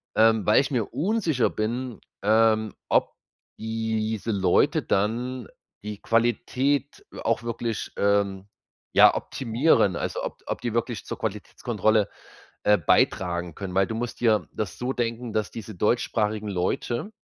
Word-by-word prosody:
ähm, 110 Hz, -1 st, +4 dB
weil 105 Hz, +5 st, +5 dB
ich 140 Hz, -, -4 dB
mir 115 Hz, -5 st, +1 dB
unsicher 170 Hz, -, +1 dB
bin, 120 Hz, +2 st, -3 dB, 0.2 s
ähm, 110 Hz, 0 st, +3 dB, 0.2 s
ob -, -, +2 dB, 0.5 s
diese 110 Hz, 0 st, -2 dB
Leute 95 Hz, -3 st, +3 dB
dann 120 Hz, +4 st, -1 dB, 0.4 s
die 105 Hz, -1 st, -6 dB
Qualität 125 Hz, +5 st, 0 dB, 0.2 s
auch 115 Hz, +1 st, 0 dB
wirklich, 115 Hz, -1 st, -3 dB
ähm, 100 Hz, -1 st, +1 dB, 0.5 s
ja, -, -, +8 dB
optimieren, 115 Hz, -, +2 dB
also -, -, -3 dB
ob -, -, -5 dB
ob -, -, -3 dB
die 120 Hz, -2 st, -2 dB
wirklich 115 Hz, -3 st, -2 dB
zur -, -, -6 dB
Qualitätskontrolle, 110 Hz, 0 st, 0 dB, 0.5 s
äh, 105 Hz, 0 st, +5 dB
beitragen 85 Hz, +1 st, +1 dB
können, 95 Hz, -2 st, -6 dB
weil 95 Hz, 0 st, +3 dB
du 110 Hz, -, -4 dB
musst 120 Hz, +1 st, -4 dB
dir 105 Hz, -8 st, +3 dB
das 105 Hz, -6 st, -4 dB
so 125 Hz, +2 st, -2 dB
denken, 115 Hz, -1 st, -3 dB
dass 110 Hz, -1 st, -1 dB
diese 110 Hz, -2 st, -8 dB
deutschsprachigen 105 Hz, 0 st, 0 dB
Leute 110 Hz, -, -2 dB
110 Hz, 135 wpm, -25 LUFS, 105-120 Hz, 0.5 s, ja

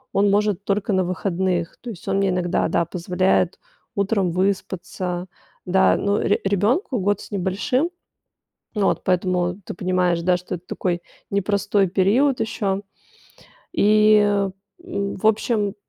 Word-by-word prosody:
он 200 Hz, +1 st, +4 dB
может 205 Hz, -1 st, +1 dB
только 200 Hz, 0 st, 0 dB
на 185 Hz, 0 st, +2 dB
выходных. 180 Hz, -1 st, -1 dB
То 245 Hz, -, -7 dB
есть, 195 Hz, -3 st, -9 dB
он 195 Hz, 0 st, +1 dB
мне 195 Hz, -1 st, +2 dB
иногда, 180 Hz, -1 st, 0 dB
да, 170 Hz, -, +1 dB
позволяет 180 Hz, +1 st, 0 dB, 0.4 s
утром 200 Hz, -2 st, +1 dB
выспаться. 185 Hz, -1 st, -2 dB, 0.4 s
Да, 190 Hz, +1 st, +4 dB
ну, 200 Hz, +1 st, +1 dB
ре 200 Hz, -, +1 dB
ребёнку 215 Hz, -, +1 dB
год 205 Hz, +1 st, +1 dB
с -, -, -11 dB
небольшим. 205 Hz, -, 0 dB, 0.9 s
Ну 205 Hz, -2 st, +1 dB
вот, -, -, 0 dB
поэтому 180 Hz, 0 st, 0 dB
ты -, -, -5 dB
понимаешь, 180 Hz, -1 st, +1 dB
да, 180 Hz, +1 st, +2 dB
что 180 Hz, +1 st, -6 dB
это 175 Hz, +1 st, -8 dB
такой 175 Hz, -2 st, -2 dB, 0.3 s
непростой 200 Hz, 0 st, +1 dB
период 220 Hz, +10 st, +2 dB
ещё. 200 Hz, -3 st, -1 dB, 0.9 s
И, 215 Hz, -6 st, +5 dB, 0.7 s
м, 200 Hz, -, -3 dB
в 215 Hz, -, -1 dB
общем, 215 Hz, -2 st, +1 dB
195 Hz, 140 wpm, -22 LUFS, 180-205 Hz, 0.9 s, И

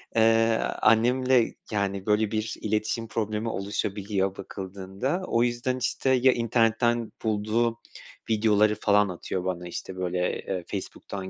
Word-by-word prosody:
Iıı, 115 Hz, 0 st, +4 dB, 0.2 s
annemle, 125 Hz, +2 st, +4 dB, 0.2 s
yani, 100 Hz, -2 st, -1 dB
böyle, 105 Hz, 0 st, +2 dB
bir 110 Hz, 0 st, -2 dB
iletişim 110 Hz, +2 st, -1 dB
problemi 110 Hz, 0 st, -2 dB
oluşabiliyor 100 Hz, -1 st, -2 dB
bakıldığında, 100 Hz, -, -4 dB
o 115 Hz, -, +2 dB
yüzden, 120 Hz, +1 st, -1 dB
işte, 130 Hz, +1 st, -1 dB
ya 130 Hz, 0 st, +5 dB
internetten 115 Hz, 0 st, +1 dB
bulduğu 110 Hz, +2 st, 0 dB, 0.5 s
videoları 105 Hz, -1 st, +3 dB
falan 105 Hz, -1 st, +3 dB
atıyor 90 Hz, +1 st, -4 dB
bana. 90 Hz, -1 st, -3 dB
İşte, 90 Hz, +2 st, -6 dB
böyle, 90 Hz, 0 st, -2 dB
ııı, 95 Hz, -2 st, -2 dB
Facebook'tan 95 Hz, -1 st, -6 dB
110 Hz, 120 wpm, -26 LUFS, 100-115 Hz, 0.5 s, ya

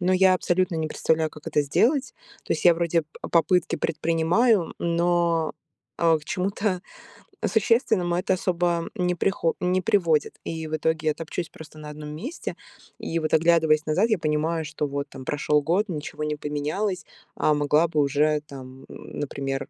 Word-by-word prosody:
но 185 Hz, +1 st, +2 dB
я 185 Hz, 0 st, +5 dB
абсолютно 180 Hz, -1 st, 0 dB
не 160 Hz, -1 st, -1 dB
представляю, 160 Hz, 0 st, 0 dB
как 150 Hz, +1 st, -14 dB
это 150 Hz, -2 st, +2 dB
сделать. 260 Hz, -, +1 dB, 0.3 s
То -, -, -1 dB
есть -, -, -3 dB
я 175 Hz, -, +7 dB
вроде 170 Hz, 0 st, +1 dB
п 150 Hz, -, -31 dB, 0.2 s
попытки 175 Hz, +1 st, +2 dB
предпринимаю, 165 Hz, +6 st, +1 dB
но, 170 Hz, -1 st, +1 dB, 0.5 s
а, 165 Hz, -2 st, +4 dB
к 150 Hz, -, -16 dB
чему-то 185 Hz, +2 st, -1 dB, 0.6 s
существенному 220 Hz, -5 st, +2 dB
это 185 Hz, +2 st, +1 dB
особо 175 Hz, -2 st, 0 dB
не 180 Hz, -3 st, +1 dB
прихо 170 Hz, -2 st, 0 dB
не 180 Hz, +1 st, +1 dB
приводит. 175 Hz, -7 st, +1 dB
И 160 Hz, -1 st, -4 dB
в 155 Hz, -, -2 dB
итоге 155 Hz, 0 st, 0 dB
я -, -, +1 dB
топчусь 165 Hz, +1 st, -5 dB
просто 155 Hz, -1 st, -13 dB
на 150 Hz, 0 st, -8 dB
1 150 Hz, 0 st, -8 dB
месте. 265 Hz, -, -6 dB, 0.4 s
И 165 Hz, -, -2 dB
вот 155 Hz, -1 st, -2 dB
оглядываясь 160 Hz, -1 st, +4 dB
назад, 185 Hz, +9 st, +2 dB
я 215 Hz, -, +3 dB
понимаю, 160 Hz, +1 st, 0 dB
что 150 Hz, 0 st, -3 dB
вот 140 Hz, +1 st, -3 dB
там 135 Hz, -1 st, -10 dB
прошел 150 Hz, +1 st, +1 dB
год, 180 Hz, +8 st, +1 dB
ничего 155 Hz, -2 st, -5 dB
не 150 Hz, 0 st, -1 dB
поменялось, 150 Hz, +7 st, -2 dB, 0.3 s
а 155 Hz, -, +2 dB
могла 150 Hz, +3 st, +3 dB
бы 155 Hz, -2 st, -1 dB
уже 150 Hz, +2 st, +2 dB
там, 130 Hz, -1 st, -11 dB
м, -, -, -9 dB
например, 135 Hz, -1 st, -3 dB
165 Hz, 170 wpm, -25 LUFS, 150-180 Hz, 0.6 s, я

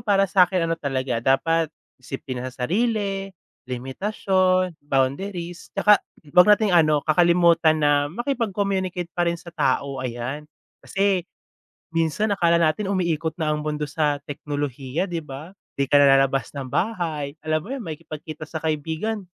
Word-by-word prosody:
para 200 Hz, -3 st, +3 dB
sa'kin 180 Hz, -2 st, +3 dB
ano 165 Hz, -, 0 dB
talaga, 135 Hz, -6 st, -2 dB
dapat 160 Hz, +6 st, +2 dB, 0.3 s
disiplina 130 Hz, -1 st, -5 dB
sa 125 Hz, 0 st, -5 dB
sarili, 200 Hz, -, 0 dB, 0.4 s
limitasyon, 185 Hz, -, 0 dB
boundaries, 170 Hz, +6 st, -2 dB
tsaka 205 Hz, 0 st, +5 dB, 0.3 s
huwag 180 Hz, +3 st, +7 dB
nating 210 Hz, -1 st, +4 dB
ano, 155 Hz, -4 st, +4 dB
kakalimutan 170 Hz, 0 st, +4 dB
na 145 Hz, -1 st, +2 dB
makipag-communicate 195 Hz, -, -2 dB
pa 175 Hz, -1 st, +1 dB
rin 170 Hz, -, -1 dB
sa 170 Hz, 0 st, -12 dB
tao, 135 Hz, -2 st, 0 dB
ayan. 130 Hz, +4 st, -5 dB, 0.3 s
Kasi 195 Hz, -2 st, 0 dB, 0.6 s
minsan 165 Hz, +6 st, 0 dB
akala 170 Hz, -2 st, +3 dB
natin 190 Hz, +5 st, +1 dB
umiikot 165 Hz, -4 st, 0 dB
na 155 Hz, -, 0 dB
ang 150 Hz, -, -5 dB
mundo 150 Hz, -1 st, -2 dB
sa 145 Hz, -1 st, 0 dB
teknolohiya, 145 Hz, +2 st, -3 dB
'di 170 Hz, -3 st, -4 dB
ba. 150 Hz, +7 st, -9 dB, 0.2 s
‘Di 140 Hz, -1 st, -1 dB
ka 145 Hz, -, +4 dB
na 140 Hz, -1 st, +6 dB
lalabas 135 Hz, -1 st, 0 dB
ng 140 Hz, -2 st, -6 dB
bahay, 160 Hz, -, -2 dB
alam 155 Hz, 0 st, -1 dB
mo 245 Hz, -, -6 dB
yun, 275 Hz, -, -4 dB
makikipagkita 155 Hz, -3 st, -7 dB
sa 160 Hz, 0 st, -6 dB
kaibigan, 160 Hz, +7 st, -2 dB
165 Hz, 140 wpm, -23 LUFS, 145-185 Hz, 0.6 s, huwag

